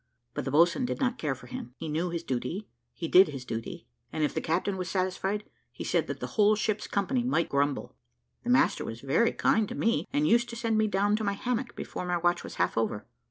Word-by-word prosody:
But - - -3
the 135 - -2
boatswain 170 - +4
did - - -3
not 255 -3 0
care 145 -4 -1
for 130 - -14
him; 125 0 -7
he 165 - -5
knew 160 +4 -1
his 170 -1 -3
duty, 170 - -3 0.2
he 165 - -5
did 185 +3 +7
his 135 -4 -7
duty, 115 -2 -5 0.3
and 155 - -1
if 150 - +1
the - - -1
captain 180 +5 0
was 185 -1 -4
satisfied, 190 +2 -1 0.3
he - - -7
said - - +1
that - - -4
the - - -3 0.2
whole 210 +1 +6
ship's 215 0 -1
company 240 +5 0
might 240 -9 +1
grumble. 140 0 0 0.5
The - - -4
master - - +4
was 115 +1 -6
very 155 +13 +3
kind 220 -2 +2
to - - -5
me, 230 +1 +1
and 295 +2 +2
used 235 +1 +3
to 235 - -6
send 230 -1 0
me 215 0 +3
down 205 +1 +2
to 220 - -3
my 200 -1 +1
hammock 245 +4 -2
before 180 - -5
my 175 0 +1
watch 175 0 +1
was - - -8
half - - +1
over. 105 -2 -1
185 Hz, 240 wpm, -29 LUFS, 150-220 Hz, 0.5 s, did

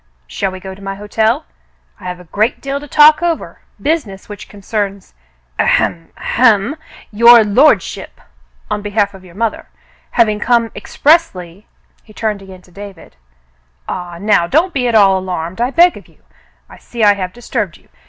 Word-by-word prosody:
"Shall 190 - -3
we 185 - -8
go 190 +1 -8
to 195 - -15
my 195 0 -5
hotel? 215 +2 -1 0.5
I - - -13
have 180 0 -5
a - - -13
great 210 +7 -1
deal 275 0 -4
to 290 - -11
talk 300 +2 +6
over 340 -2 -3
— - - -40
business 275 - -3
which 205 -1 -10
concerns 200 -1 -5 0.2
— - - -40
ahem 165 -1 0
— - - -29
ahem 230 +1 +2 0.2
— - - -21
your 235 -1 +9
lordship, 250 +9 +1 0.5
on 210 0 -1
behalf 205 0 -1
of 190 -1 -14
your 180 -2 -16
mother, 225 +1 -3 0.5
having 215 -3 +3
come 230 0 +1
ex - - -11
pressly 205 - +1
— - - -40
" - - -38
he 215 - -18
turned 210 -2 -3
again 190 -1 -13
to 180 - -22
David. 195 - -12 0.7
"Ah, 175 -1 -6
now 200 -3 +2
don't 330 - +1
be 250 -4 0
at 235 - 0
all 195 -3 +5
alarmed, 185 +1 -5
I 245 - +1
beg 345 +5 +4
of - - -13
you. - - -27 0.4
I - - -15
see 235 -2 -5
I 205 -1 +6
have 185 -2 -5
disturbed 215 -4 -4
you. - - -28
205 Hz, 190 wpm, -15 LUFS, 190-240 Hz, 0.7 s, your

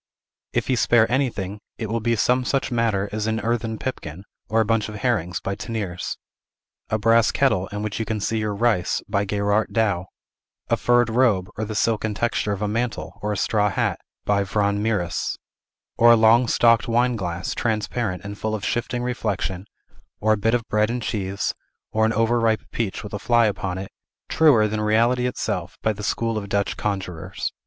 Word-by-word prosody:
If - - 0
he 130 - +1
spare 120 -1 +4
anything, 105 -7 -1 0.2
it 110 - -3
will 115 +2 -1
be 115 +1 +1
some 125 +3 +2
such 135 +1 -1
matter 110 -4 +1
as 105 +1 -2
an 110 0 0
earthen 115 -1 -1
pipkin, 95 - -5 0.3
or 115 - +2
a 110 - +3
bunch 110 0 +1
of 105 - -7
herrings 105 -6 -1
by 100 - -3
Teniers; 100 -7 -4 0.7
a 110 - +1
brass 115 +1 +4
kettle, 95 -9 +2
in 105 0 -5
which 105 0 -3
you 115 - -1
can 110 -1 -2
see 110 +2 -1
your 105 -1 -2
rice, 110 -4 +1
by 100 0 0
Gerard 100 +2 +1
Douw; 100 -6 +1 0.7
a - - +5
furred 120 -1 +3
robe, 110 -6 +2
or 110 - -3
the 110 0 -5
silken 110 0 0
texture 115 -2 0
of 100 +1 -2
a - - +1
mantle, 115 +2 -3
or 105 - -1
a 105 - -2
straw 105 +1 +2
hat, - - -1 0.3
by 100 -1 +2
Van 100 +1 0
Mieris; 100 -6 -1 0.6
or 120 0 +7
a - - +8
long 115 +2 +5
stalked 115 0 +4
wineglass, 115 -8 0
transparent 110 -3 -2
and 100 +1 -7
full 110 0 -1
of 105 - -5
shifting 120 +1 -1
reflection, 100 -6 -2 0.5
or 110 +1 +3
a - - +3
bit 115 +3 +2
of 115 -2 -2
bread 105 +1 +2
and 120 0 -2
cheese, 100 -2 -2 0.4
or 110 0 +2
an 115 - 0
over 115 +1 +2
ripe 115 -1 +1
peach 110 -5 -3
with 105 - -8
a 105 - -3
fly 120 +2 +3
upon 95 -3 -2
it, 95 0 -6 0.4
truer 135 -10 +5
than 105 0 -2
reality 120 +4 +2
itself, 125 - -3
by 110 - +2
the 105 - -9
school 115 +2 -1
of 100 -1 -8
Dutch 100 0 0
conjurers. 95 -5 -4
110 Hz, 195 wpm, -23 LUFS, 100-115 Hz, 0.7 s, a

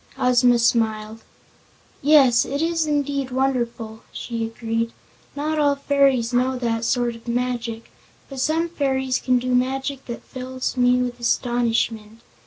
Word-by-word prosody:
Ozma 245 -1 +4
smiled. 225 -2 0 0.8
"Yes, 270 -5 +5
it 280 +2 -3
is 330 0 0
indeed 285 -2 -1
wonderful," 240 -4 -2
she 230 -2 -4
agreed. 225 0 -3 0.4
"Not 305 +2 -1
all 285 -1 +3
fairies 275 -4 +2
know 255 +1 +1
that 230 -2 -1
sort 240 -1 0
of 230 +1 -15
magic, 235 -1 -3 0.4
but 270 -2 -8
some 315 +5 +1
fairies 265 -5 -1
can 255 -1 +2
do 250 +1 -1
magic 265 +2 -1
that 235 - -6
fills 255 0 -5
me 250 0 +3
with 245 -1 -5
astonishment. 230 -2 -1
250 Hz, 135 wpm, -22 LUFS, 235-270 Hz, 0.8 s, Yes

